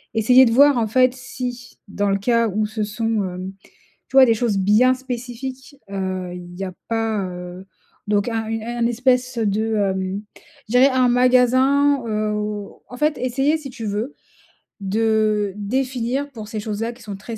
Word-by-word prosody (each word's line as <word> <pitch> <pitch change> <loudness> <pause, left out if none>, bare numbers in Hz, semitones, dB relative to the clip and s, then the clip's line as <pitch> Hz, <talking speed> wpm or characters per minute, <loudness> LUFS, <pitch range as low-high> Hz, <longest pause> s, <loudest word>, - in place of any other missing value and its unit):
Essayer 250 +4 +6
de 230 - +1
voir 280 +2 +6
en 220 - 0
fait 255 +3 +3
si, 245 -1 -7
dans 200 0 -1
le 195 - +2
cas 230 +2 +2
où 210 +2 0
ce 215 0 -5
sont, 220 0 -1
hem, 185 +1 -6 0.6
tu 265 - -5
vois, 265 -1 +9
des 230 - +4
choses 215 -3 0
bien 215 +7 +4
spécifiques. 255 +2 -7
Heu, 185 -2 -3
il 175 0 -10
y 195 - -3
a 185 -1 -6
pas, 225 -3 -1
heu, 180 +1 -8 0.4
donc 205 +2 +1
un 225 -1 -2
une 225 -1 -3
un 240 +1 -2
espèce 250 +1 +1
de, 220 +1 0
hem, 190 0 -1 0.5
je - - -7
dirais 250 +2 +6
un 255 -1 +3
magasin, 255 +3 +3
heu, 215 -1 -1
où, 210 -1 -5
en 250 - -9
fait, 300 0 +1
essayer 270 +5 +1
si 275 -4 -8
tu 225 -3 -7
veux 215 +7 -3 0.7
de 215 0 +1
définir 255 +4 -2
pour 220 -4 -9
ces 215 - -4
choses-là, 215 +2 -3
qui 240 - -16
sont 205 -2 -6
très 220 +3 -8
225 Hz, 180 wpm, -21 LUFS, 205-255 Hz, 0.7 s, vois